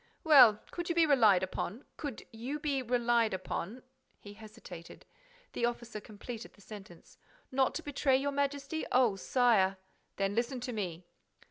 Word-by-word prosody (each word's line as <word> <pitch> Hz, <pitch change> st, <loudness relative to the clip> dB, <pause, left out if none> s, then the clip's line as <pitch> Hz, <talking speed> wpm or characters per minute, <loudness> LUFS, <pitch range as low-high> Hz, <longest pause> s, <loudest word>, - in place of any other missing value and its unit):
"Well, 255 Hz, -9 st, +7 dB
could 345 Hz, 0 st, -5 dB
you 340 Hz, -, 0 dB
be 335 Hz, -1 st, +5 dB
relied 220 Hz, -, +5 dB
upon—could 235 Hz, -, -6 dB
you 245 Hz, +6 st, -4 dB
be 285 Hz, -3 st, -1 dB
relied 240 Hz, -3 st, +1 dB
upon—" 195 Hz, +5 st, -5 dB, 0.4 s
He 205 Hz, -, -11 dB
hesitated. 205 Hz, -5 st, -12 dB, 0.5 s
The 235 Hz, -, 0 dB
officer 240 Hz, -2 st, -6 dB
completed 220 Hz, +2 st, -9 dB
the 205 Hz, -, -21 dB
sentence: 195 Hz, -5 st, -13 dB, 0.3 s
"Not 265 Hz, 0 st, +1 dB
to 330 Hz, -, -4 dB
betray 280 Hz, -2 st, +1 dB
your 285 Hz, +1 st, -1 dB
Majesty! 280 Hz, +2 st, -2 dB
Oh, 245 Hz, -5 st, +4 dB
sire!—" 195 Hz, -3 st, +2 dB, 0.4 s
"Then 195 Hz, 0 st, -1 dB
listen 240 Hz, +3 st, -1 dB
to 250 Hz, 0 st, -4 dB
me." 180 Hz, -5 st, -4 dB
240 Hz, 145 wpm, -32 LUFS, 205-270 Hz, 0.5 s, Well